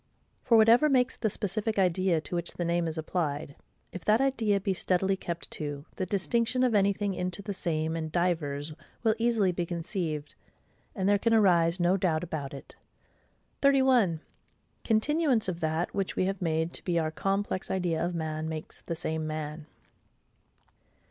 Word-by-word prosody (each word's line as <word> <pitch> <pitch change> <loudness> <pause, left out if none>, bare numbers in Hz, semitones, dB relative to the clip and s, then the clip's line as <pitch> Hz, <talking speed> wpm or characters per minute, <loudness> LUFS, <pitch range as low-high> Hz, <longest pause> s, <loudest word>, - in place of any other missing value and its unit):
For 230 - +5
whatever 230 +7 +6
makes 255 -2 +2
the 220 - -1
specific 210 +2 -2
idea 185 -2 +2
to 160 - -8
which 170 -1 -3
the 175 - -2
name 170 0 +1
is 160 0 -4
applied, 155 -3 -2 0.4
if 180 - -8
that 215 +2 +4
idea 230 -7 +1
be 195 0 -1
steadily 190 +1 +1
kept 170 -2 -6
to, 145 -1 -4
the 185 - -2
distinction 235 +6 +1
of 250 -3 +2
anything 200 0 +2
into 180 +2 -3
the 200 0 -4
same 160 -3 -1
and 160 -1 -4
divers 155 -4 -1 0.3
will 220 -2 +4
easily 225 -5 +2
be 175 0 -2
conceived, 165 -3 -3 0.6
and 190 -3 -1
there 205 0 +4
can 230 +2 +2
arise 175 -4 +4
no 175 +2 +3
doubt 175 -4 0
about 155 -5 -4
it. 140 - -11 0.9
31. 260 - +4 0.6
Continuance 255 - +2
of 175 -2 -3
that 160 +1 -1
which 195 -2 -2
we 185 - +1
have 195 0 -2
made 160 0 0
to - - 0
be 175 -2 0
our 160 -1 0
complex 195 +2 -2
idea 175 -4 0
of 175 0 -2
man 160 -1 -3
makes 160 -1 -7
the 170 - -4
same 160 0 -3
man. 155 0 -5
180 Hz, 170 wpm, -29 LUFS, 160-205 Hz, 0.9 s, whatever